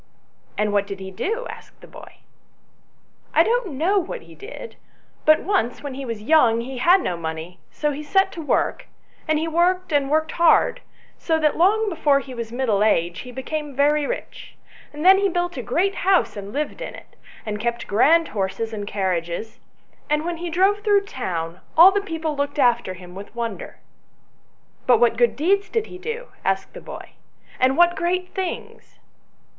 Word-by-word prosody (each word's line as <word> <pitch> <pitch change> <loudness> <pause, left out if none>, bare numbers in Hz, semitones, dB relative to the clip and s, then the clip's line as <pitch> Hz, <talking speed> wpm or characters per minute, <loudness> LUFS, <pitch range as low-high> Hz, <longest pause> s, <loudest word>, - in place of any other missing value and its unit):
" - - -37
And 210 -1 0
what 200 -1 +1
did 200 -1 -6
he 190 0 -7
do? 450 - -3
" - - -15
asked - - -14
the - - -14
boy. - - -13 0.6
" - - -39
I - - +7
don't 470 -7 0
know 350 +9 +2
what 385 +7 -6
he - - -15
did; 460 +3 -10 0.5
but 310 0 +5
once 290 - -1
when 285 -2 -5
he 270 +1 -6
was 230 -3 -5
young 235 -5 +4
he 255 +1 -6
had 360 +7 +5
no 180 - -2
money, 165 +2 -6
so 300 -1 -2
he 290 +1 -5
set 385 +6 +2
to 335 - -7
work, - - -1 0.4
and 310 0 +2
he 320 +2 -1
worked 355 +2 +1
and 280 -2 +2
worked 315 +1 +1
hard, 335 -1 +3 0.4
so 325 -2 +1
that 300 -1 +2
long 420 +6 +3
before 310 -6 +2
he 265 -1 -9
was 235 -2 -6
middle 235 -5 +1
aged 170 -2 +1
he 250 - -9
became 290 +3 -5
very 290 +1 +2
rich; - - -7 0.4
and 300 +3 -6
then 385 +1 +8
he 400 0 +2
built 350 0 -2
a 255 - -4
great 355 +12 0
house 380 -1 +2
and 200 -1 -7
lived 300 - -3
in - - -6
it, - - -15 0.3
and 210 -1 -4
kept 235 +2 -2
grand 320 +11 +3
horses 220 +3 -3
and 205 -2 -5
carriages, 185 +1 -3 0.5
and 300 +1 +1
when 345 -1 -3
he 345 +1 -5
drove 385 +5 +2
through 410 -1 +3
the - - -14
town, 175 - -4 0.2
all 350 +4 +10
the 405 +1 0
people 325 -5 -3
looked 285 +1 -2
after 240 -8 +2
hirn 180 0 -12
with 200 +4 -10
wonder." 235 -1 -5 0.6
" - - -39
But 245 -3 +5
what 235 -1 +4
good 240 0 +2
deeds 395 +7 +1
did 450 -2 -1
he 360 - -11
do 465 +5 -5
?" - - -31
asked 195 0 -1
the - - -9
boy, - - -10 0.2
" - - -26
and 260 +1 +3
what 345 0 +5
great 360 +2 -1
things 375 -3 -6
295 Hz, 200 wpm, -22 LUFS, 225-360 Hz, 0.6 s, all